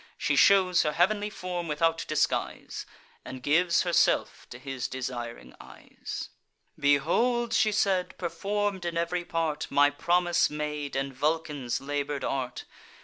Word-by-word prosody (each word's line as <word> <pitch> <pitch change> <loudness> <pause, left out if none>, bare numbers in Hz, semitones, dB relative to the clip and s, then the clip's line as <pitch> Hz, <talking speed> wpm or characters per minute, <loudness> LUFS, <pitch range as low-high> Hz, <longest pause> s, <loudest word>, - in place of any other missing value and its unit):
She - - 0
shews 185 -3 +5
her 150 - 0
heav'nly 205 +5 +2
form 180 -4 -5
without 165 +2 0
disguise, 155 - -1 0.4
And 130 -1 -9
gives 170 +4 +3
herself 175 -2 +1
to 120 - -9
his 130 -1 -4
desiring 120 - -6
eyes. - - -8 0.5
"Behold," 175 - +2
she 215 -1 +3
said, 195 -3 0
"perform'd 200 +2 -2
in 170 -1 -3
ev'ry 170 +1 -1
part, 165 -3 -2
My 145 0 +4
promise 175 +3 +2
made, 150 -1 -4
and 135 0 -2
Vulcan's 145 -2 -1
labour'd 145 0 -3
art. 130 -2 -3
160 Hz, 130 wpm, -28 LUFS, 140-180 Hz, 0.5 s, shews